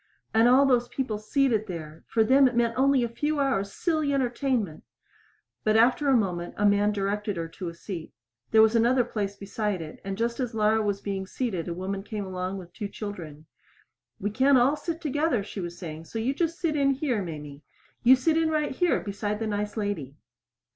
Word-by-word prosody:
And 225 +2 +5
all 260 +3 +6
those 245 -3 +3
people 235 -6 -3
seated 220 -1 +1
there 160 -3 -7
for 225 - +2
them 265 +4 +5
it 250 - -2
meant 235 -1 +2
only 270 -1 +3
a - - +1
few 295 +6 -2
hours' 200 -8 0
silly 310 - 0
entertainment! 245 - -1 0.8
But 215 0 +3
after 250 +5 +4
a 265 - +5
moment 175 -5 -2
a 205 - +1
man 205 +1 +4
directed 205 0 -2
her 165 -1 -3
to 175 +1 -6
a 170 - -10
seat. 170 -2 -7 0.4
There 220 0 +6
was 220 +1 +3
another 240 +2 +4
place 205 -4 -3
beside 200 0 -3
it, 155 -1 -9
and 195 0 -4
just 235 +2 -1
as 245 -3 -2
Laura 215 0 +3
was 205 -2 -1
being 195 -1 -3
seated 190 -8 -3
a 170 - -2
woman 195 +2 -3
came 210 0 -5
along 185 +1 -4
with 175 -2 -10
two 210 - -4
children. 170 -8 -8 0.7
"We 205 +2 -2
can't 265 +5 +4
all 255 +4 +4
sit 330 +2 -5
together," 295 - 0
she 205 - -7
was 175 -1 -5
saying, 160 -2 -7
"so 225 - -7
you 235 +5 0
just 330 +2 -1
sit 330 -4 0
in 275 -2 +3
here, 260 -6 -1
Mamie. 150 -5 -7 0.4
You 255 +2 +7
sit 320 +5 +2
right 305 -1 0
in - - -5
here 350 +5 +1
beside 205 0 -3
the 225 - -3
nice 210 0 -3
lady." 200 -11 -3
215 Hz, 205 wpm, -27 LUFS, 195-260 Hz, 0.8 s, You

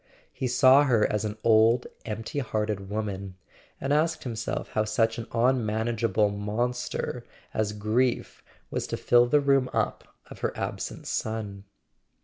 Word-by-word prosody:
He 130 - -2
saw 130 +3 +6
her 115 -6 +3
as 105 0 0
an 105 0 -4
old 115 +2 +5 0.2
empty 110 +5 -4
hear 110 -5 -1
ted 100 -3 -4
woman, 100 -3 -4 0.4
and 140 +1 0
asked 160 +2 +1
himself 115 -2 -4
how 110 - 0
such 115 +2 +1
an 115 - -6
unmanageable 115 -3 +1
monster 110 +5 -2 0.3
as 110 -1 0
grief 110 +4 -1 0.3
was - - -2
to - - -3
fill 120 0 +4
the 150 +4 +4
room 135 -2 +2
up - - -2
of - - -12
her - - -2
absent - - -4
son. 105 -3 -3
115 Hz, 145 wpm, -27 LUFS, 105-125 Hz, 0.4 s, saw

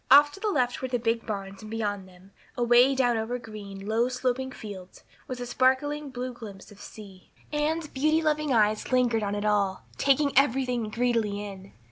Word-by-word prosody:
Off 290 +2 +8
to 390 - -11
the 430 - -2
left 250 -9 0
were 260 - -2
the 250 -1 0
big 230 -1 -1
barns 195 -2 -5
and 215 - -9
beyond 205 -3 -3
them, 185 +2 -19 0.3
away 245 +2 +5
down 245 -3 +2
over 225 +3 -2
green, 205 -4 -9
low 225 +3 +1
sloping 255 +1 -1
fields, 195 -6 -10 0.2
was 255 -1 -5
a 245 - -4
sparkling 275 +4 +1
blue 255 0 -5
glimpse 210 -4 -11
of 205 - -15
sea. 195 -4 -12 0.2
Anne's 305 +2 0
beauty 305 +3 +1
loving 305 -2 0
eyes 215 -1 +2
lingered 245 -3 +3
on 205 0 -2
it 205 +1 -3
all, 200 -3 +1
taking 280 +1 +2
everything 250 -4 +2
greedily 220 -3 0
in. 195 -1 -10
240 Hz, 185 wpm, -27 LUFS, 210-265 Hz, 0.3 s, Off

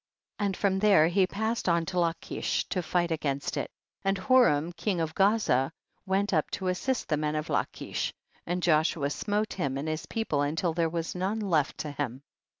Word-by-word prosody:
32. 205 - +1
And 195 - -3
from 190 -2 +1
there 195 -6 +6
he 185 +1 +3
passed 220 +1 -1
on 170 -1 +2
to 180 +1 -1
Lachish 170 0 -1
to 185 - 0
fight 175 0 0
against 140 -3 -1
it, - - -2 0.3
and 195 0 +1
Horam 190 - +4
king 195 -5 -1
of 160 -1 -1
Gaza 195 - +3 0.4
went 195 +1 +1
up 155 -3 +2
to 190 -2 -2
as 180 - -1
sist 260 -2 -1
the 155 - +1
men 150 0 -1
of 155 0 -3
Lachish, - - -2 0.4
and 175 +1 -1
Joshua 155 -3 +2
smote 210 +6 -1
him 140 -7 -2
and 145 +3 -3
his 155 0 -3
people 220 -11 -1
until 160 +4 0
there 165 0 +1
was 165 0 -3
none 190 +5 -1
left 170 -9 +1
to 150 - -4
him. 140 -2 -4
175 Hz, 195 wpm, -28 LUFS, 155-195 Hz, 0.4 s, there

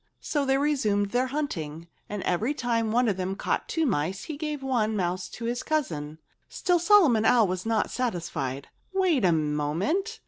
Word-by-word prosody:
So 290 -3 -1
they 270 0 +3
resumed 215 -9 +1
their 250 +2 +1
hunting. 170 - -4 0.2
And 205 -2 -4
every 220 +11 0
time 230 -4 0
one 245 +2 +3
of 200 -4 0
them 190 +1 -2
caught - - -2
two 325 -1 +1
mice, 185 - -1
he 310 - -5
gave 300 -2 -4
one 230 -5 0
mouse 180 -2 -2
to 235 - -7
his 240 +1 -1
cousin. 155 - -2 0.3
Still 355 -2 +1
Solomon 335 - +5
Owl 230 0 +5
was 185 +3 -3
not 225 -2 +1
satisfied. 165 - -3 0.2
"Wait 365 - +2
a 180 - +5
moment!" 165 - -1
225 Hz, 175 wpm, -27 LUFS, 180-285 Hz, 0.3 s, Solomon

